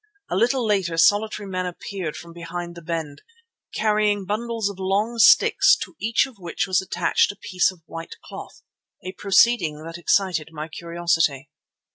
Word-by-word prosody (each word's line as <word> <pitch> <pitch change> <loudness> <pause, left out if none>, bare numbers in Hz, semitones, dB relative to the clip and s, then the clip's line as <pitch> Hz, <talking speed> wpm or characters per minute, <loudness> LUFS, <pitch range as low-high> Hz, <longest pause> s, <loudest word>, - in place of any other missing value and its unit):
A - - 0
little 240 +5 +2
later 190 -6 0
solitary 205 +4 +2
men 185 -1 -3
appeared 180 -2 -6
from 170 0 -10
behind 170 0 -6
the 170 - -11
bend, 160 -3 -5 0.5
carrying 210 -2 +1
bundles 225 +1 -2
of 200 -2 -6
long 205 +5 -1
sticks 390 - +6
to - - -13
each 225 +4 +2
of 255 -6 -14
which 175 0 -3
was 190 -1 +1
attached 190 - +1
a 200 - -16
piece 180 -1 +1
of 175 -3 -19
white 165 0 -8
cloth, - - -10 0.4
a 185 - -4
proceeding 190 -5 +2
that 165 +1 -8
excited 175 -3 +1
my 155 -1 -6
curiosity. 165 -4 -1
185 Hz, 160 wpm, -23 LUFS, 170-210 Hz, 0.5 s, sticks